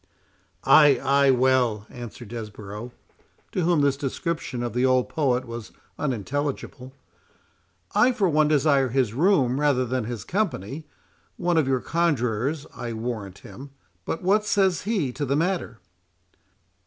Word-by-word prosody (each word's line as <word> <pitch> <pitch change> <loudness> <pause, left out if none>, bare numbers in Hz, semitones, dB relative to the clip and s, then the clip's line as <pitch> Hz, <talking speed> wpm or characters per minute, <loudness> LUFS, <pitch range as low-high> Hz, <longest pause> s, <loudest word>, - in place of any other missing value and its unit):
"Ay, 145 -5 +6
ay! 140 0 +4
well," 125 -4 +2
answered 120 -2 -9
Desborough, 105 0 -7 0.6
to 185 - -1
whom 170 -2 +2
this 140 -1 +2
description 140 -2 -3
of 120 -3 -3
the 125 +1 0
old 130 -1 +3
poet 130 -5 0
was 115 -2 -8 0.3
unintelligible—"I 135 - -4
for 220 -6 +1
one 155 -2 +3
desire 140 -3 +3
his 125 -3 0
room 140 - +2
rather 140 -4 +2
than 125 -1 -2
his 115 -3 -5
company; 155 - -3 0.5
one 175 0 0
of 155 -4 +2
your 130 -2 +1
conjurors, 145 -3 0
I 120 -2 -5
warrant 110 -4 -5
him. 140 +2 -10 0.3
But 165 - -4
what 205 +4 +3
says 195 -4 +2
he 180 - 0
to 145 - -4
the 140 0 0
matter?" 165 -7 -1
135 Hz, 135 wpm, -24 LUFS, 120-155 Hz, 0.6 s, Ay